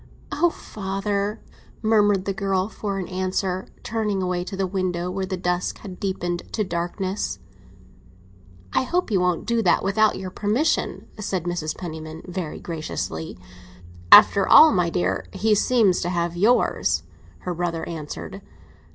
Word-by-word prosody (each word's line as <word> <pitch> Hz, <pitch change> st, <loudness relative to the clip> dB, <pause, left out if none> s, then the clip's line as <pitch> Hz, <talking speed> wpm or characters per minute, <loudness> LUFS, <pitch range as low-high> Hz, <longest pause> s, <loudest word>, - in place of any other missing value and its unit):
"Oh, 345 Hz, -, +3 dB
father," 200 Hz, -3 st, -3 dB, 0.4 s
murmured 205 Hz, -3 st, +3 dB
the 195 Hz, -, -1 dB
girl 195 Hz, -1 st, 0 dB
for 200 Hz, -3 st, -4 dB
all 180 Hz, -, -4 dB
answer, 185 Hz, 0 st, -2 dB, 0.2 s
turning 215 Hz, -3 st, -1 dB
away 180 Hz, -1 st, -1 dB
to 195 Hz, -, -6 dB
the 195 Hz, -, +1 dB
window, 180 Hz, -2 st, -2 dB
where 190 Hz, 0 st, -3 dB
the 185 Hz, 0 st, -3 dB
dusk 180 Hz, 0 st, -1 dB
had 185 Hz, -4 st, -9 dB
deepened 175 Hz, -3 st, -3 dB
to 215 Hz, -, +1 dB
darkness. 185 Hz, +2 st, -3 dB, 1.4 s
"I -, -, +3 dB
hope 345 Hz, +1 st, -1 dB
he 200 Hz, -, +3 dB
won't 180 Hz, -1 st, 0 dB
do 235 Hz, -1 st, +1 dB
that 185 Hz, -, +3 dB
without 210 Hz, +3 st, +2 dB
your 185 Hz, -1 st, -6 dB
permission," 225 Hz, -, 0 dB
said 195 Hz, -4 st, -2 dB
Mrs. 175 Hz, -3 st, -3 dB
Penniman, 160 Hz, -2 st, -7 dB
very 180 Hz, -3 st, -5 dB
graciously. 155 Hz, -, -5 dB, 0.7 s
"After 200 Hz, -, +8 dB
all, 315 Hz, 0 st, +9 dB
my 175 Hz, -2 st, +2 dB
dear, 175 Hz, +1 st, -1 dB
he 210 Hz, +3 st, +2 dB
seems 210 Hz, -3 st, +3 dB
to 175 Hz, -, -1 dB
have 170 Hz, -1 st, -1 dB
yours," 215 Hz, +8 st, +2 dB, 0.4 s
her 180 Hz, -, -3 dB
brother 170 Hz, -1 st, -3 dB
answered. 155 Hz, -3 st, -7 dB
190 Hz, 145 wpm, -23 LUFS, 175-205 Hz, 1.4 s, all